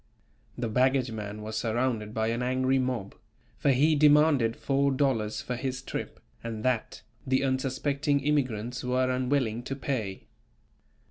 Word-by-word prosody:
The 120 - -2
baggage 130 +2 +2
man 105 -1 -6
was 110 0 -5
surrounded 115 -2 -1
by 110 0 0
an 115 +1 -1
angry 130 +1 +1
mob, 125 -6 -2 0.5
for - - +2
he 140 +4 +4
demanded 145 -5 +4
four 140 0 +1
dollars 130 -6 0
for 125 - -4
his 130 +1 -4
trip, - - -5 0.2
and 115 -1 -5
that, 125 -3 -1 0.2
the 130 +1 +2
unsuspecting 140 +2 0
immigrants 125 -4 -1
were 130 +1 +1
unwilling 125 -3 0
to 135 +2 -5
pay. 115 -8 -3
130 Hz, 140 wpm, -28 LUFS, 115-135 Hz, 0.5 s, he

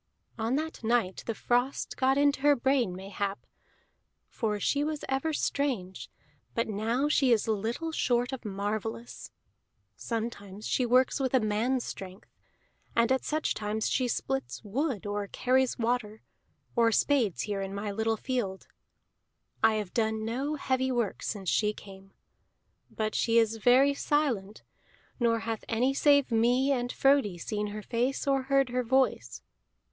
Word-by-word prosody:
"On 225 +4 0
that 315 -2 -4
night 225 -5 +1
the 230 - -2
frost 245 +5 0
got 265 +1 +2
in 285 0 +4
her 290 +1 +5
brain, 255 -7 +1
mayhap; 195 +1 -4 0.8
for 210 -3 -2
she 285 +7 +1
was 305 0 -3
ever 270 +4 0
strange, 255 -11 -2 0.5
but 230 - 0
now 225 +6 0
she 275 -4 +3
is 230 -1 +3
little 225 +10 -2
short 245 -4 +1
of 260 - -6
marvellous. 215 +3 -4 0.7
Sometimes 215 -3 -5
she 250 - +1
works 255 +4 +3
with 265 -1 0
a - - +6
man's 230 +4 0
strength; 190 0 -9 0.6
and 235 +2 +3
at 265 - +2
such 310 +1 -1
times 215 +1 -2
she 255 -2 +1
splits 270 +2 -3
wood, 240 - -2
or 205 0 -2
carries 255 +4 +1
water, 225 -2 -1 0.5
or 230 -2 +4
spades 235 - +2
here 205 -2 -3
in 195 0 -4
my 200 +1 -4
little 220 +2 0
field. 210 -7 -3 1.0
I 220 0 +4
have 210 -4 -4
done 220 -1 0
no 270 +7 -2
heavy 260 -2 0
work 240 -5 -1
since 200 -3 -4
she 210 +4 +2
came. 195 -1 -13 0.8
But 215 -1 -2
she 230 0 +2
is 225 -1 +3
very 255 +5 +5
silent, 255 -9 -1 0.6
nor 230 -2 +2
hath 225 -1 -4
any 245 +4 +2
save 285 -2 +4
me 245 +4 +3
and 245 -2 0
Frodi 270 -9 +3
seen 210 +4 -3
her 210 +1 -6
face 245 +5 -1
or 275 -1 +2
heard 275 -2 +3
her 250 +1 0
voice. 245 - 0
235 Hz, 150 wpm, -29 LUFS, 210-265 Hz, 1.0 s, a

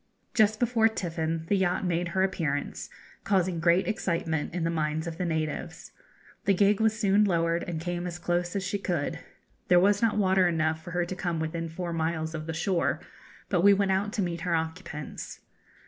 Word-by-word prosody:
Just 215 -2 +3
before 235 -2 +3
tiffin 165 -6 -2
the 200 - +2
yacht 190 -1 +1
made 175 0 0
her 190 +2 +1
appearance, 155 -7 -2 0.3
causing 185 -3 +1
great 170 +2 +3
excitement 165 -7 -1
in 175 0 -2
the 165 - +1
minds 155 0 -1
of 165 0 -6
the 180 - 0
natives. 160 -3 -3 0.5
The 195 - +4
gig 200 +2 +3
was 220 0 +2
soon 200 +1 +4
lowered 170 -3 +1
and 170 -2 -3
came 175 +1 -3
as 175 0 -5
close 175 +1 -1
as 195 - -1
she 200 +1 -2
could. 175 -7 -2 0.5
There 180 - +6
was 205 +2 +3
not 225 -2 +2
water 190 -2 +4
enough 160 -1 0
for 175 - -8
her 175 0 0
to 185 - -5
come 175 -3 -2
within 165 +1 -3
four 170 +1 -4
miles 160 -1 -1
of 155 -1 -5
the 165 - -3
shore, 175 +1 0 0.5
but 180 -4 +1
we 200 +2 +7
went 195 -1 +1
out 195 +2 0
to 210 - 0
meet 170 -1 -3
her 175 -1 0
occupants. 160 -2 -5
175 Hz, 195 wpm, -28 LUFS, 165-195 Hz, 0.5 s, we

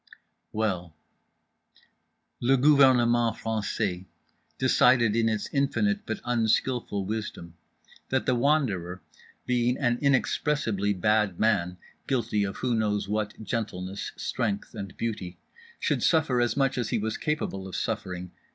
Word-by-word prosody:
Well…. 90 -7 -2 1.4
Le 135 +3 +3
gouvernement 125 -4 +4
français 100 -4 -2 0.5
decided 115 -4 +4
in 115 -1 +2
its 110 -2 -2
infinite 205 +10 0
but - - -3
unskillful 115 -3 0
wisdom 105 -5 -5 0.6
that 130 - 0
The 130 - +2
Wanderer, 120 - 0 0.4
being 125 0 +1
an 120 -3 +1
inexpressibly 130 -7 +1
bad 105 -1 +1
man 90 -5 +1 0.3
(guilty 115 -5 0
of 95 -1 -4
who 125 -2 -1
knows 105 -3 0
what 105 +1 -3
gentleness, 100 -4 -4
strength 105 -5 -2
and 100 -4 -7
beauty) 105 -6 -4 0.4
should - - 0
suffer 145 -7 +3
as 120 +1 0
much 135 -2 +1
as 120 - -2
he - - 0
was 110 +1 -2
capable 120 -11 -3
of 95 - -7
suffering. 90 -1 -3
110 Hz, 125 wpm, -27 LUFS, 100-125 Hz, 1.4 s, gouvernement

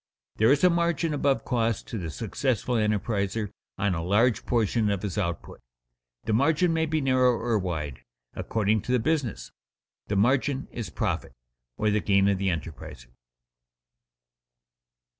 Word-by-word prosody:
There 110 +4 +4
is 145 +3 +3
a 180 - +7
margin 170 -2 0
above 140 -1 +1
costs 115 -3 0
to 115 - -6
the 85 -3 -4
successful 120 - -2
enterpriser 105 -1 0 0.3
on 100 -1 +1
a 80 - -2
large 105 +5 +2
portion 115 -2 +1
of 100 -1 -1
his 100 -3 -3
output. 85 -6 -4 0.6
The 110 - -1
margin 160 +8 +3
may 160 0 +1
be 155 0 0
narrow 130 -2 +3
or 115 -2 0
wide, 80 -8 -4 0.3
according 110 -1 0
to 125 - -4
the 125 - +4
business. 120 - -1 0.6
The 105 - -1
margin 130 +6 +1
is 115 -7 -5
"profit," 75 - -3 0.4
or 105 0 +1
the 105 - +2
gain 100 -1 +3
of 100 -2 +1
the 100 - -1
enterpriser. 80 -7 -5
110 Hz, 150 wpm, -26 LUFS, 100-130 Hz, 0.6 s, a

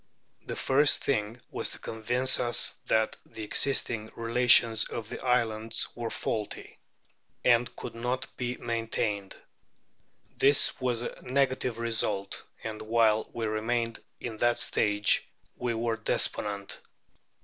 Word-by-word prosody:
The - - -3
first 145 +2 +3
thing 115 -3 -1
was - - -3
to - - -7
convince 120 +4 +1
us 120 -1 +2
that 110 0 +1
the 110 - -9
existing 110 -1 +1
relations 115 -1 +4
of 115 -2 -6
the - - -7
islands 115 -3 0
were 120 -1 -4
faulty, 105 -2 -4 0.7
and 120 0 +3
could - - -7
not 125 +2 -2
be 125 0 -3
maintained. 115 -4 -2 1.0
This 140 -1 +3
was 120 -2 0
a - - -6
negative 130 -2 0
result, 110 -4 -1 0.2
and 110 -1 -5
while 110 -1 +2
we 115 - -3
remained 115 +2 -1 0.2
in 115 -2 -5
that 120 +1 +2
stage 105 0 +2 0.3
we 120 -1 -2
were 115 0 -1
despondent. 100 -2 0
115 Hz, 125 wpm, -29 LUFS, 110-125 Hz, 1.0 s, relations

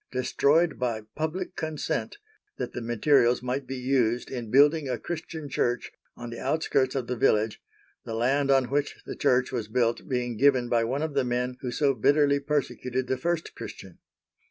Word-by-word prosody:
—destroyed 145 +6 +2
by 115 -4 -1
PUBLIC 175 +4 -3
CONSENT 155 - -3 0.4
that 125 - -4
the 125 - -4
materials 120 +1 +3
might 130 +1 -2
be 135 - -4
used 125 -2 0
in 120 -4 -5
building 145 +3 +4
a 125 - -1
Christian 160 +2 -6
Church 120 -2 -1 0.3
on 120 0 -7
the 115 - -7
outskirts 135 -3 0
of 130 -3 -1
the 125 - -3
village, 110 -1 +1 0.4
the 115 - -5
land 135 +5 +1
on 135 -2 +3
which 145 0 -1
the - - -6
Church 130 -2 +2
was 120 -5 -3
built 115 +4 0
being 125 -3 -1
given 130 -2 +3
by 115 -1 +2
one 135 +6 -1
of 160 -2 -3
the 140 -1 +2
men 125 0 -1
who 125 - -3
so 140 +3 +2
bitterly 140 +4 +3
persecuted 130 -3 -2
the 130 - 0
first 170 +3 -2
Christian. - - -10
130 Hz, 180 wpm, -27 LUFS, 120-145 Hz, 0.4 s, building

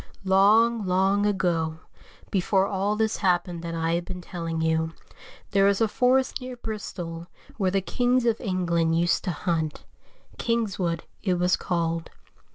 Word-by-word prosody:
LONG, 210 +3 +4
long 195 +3 +2
ago, 170 -5 0 0.5
before 190 0 +2
all 200 +1 0
this 220 0 0
happened 175 -2 0
that 165 0 -5
I 165 0 0
have 170 0 -1
been 180 0 -6
telling 165 -2 -4
you, 160 0 0 0.6
there 195 -1 +4
was 200 -1 +3
a 225 - +3
forest 255 +4 +2
near 255 0 -6
Bristol 175 -7 -6 0.3
where 195 -4 +1
the 195 +1 +1
kings 245 +4 +1
of 230 -2 +1
England 170 -5 +1
used 170 +1 +2
to 185 - 0
hunt, 160 -1 -2 0.5
Kingswood 200 -8 -1 0.2
it 185 -3 +1
was 180 +1 +2
called. 165 -2 -2
185 Hz, 150 wpm, -26 LUFS, 170-210 Hz, 0.6 s, LONG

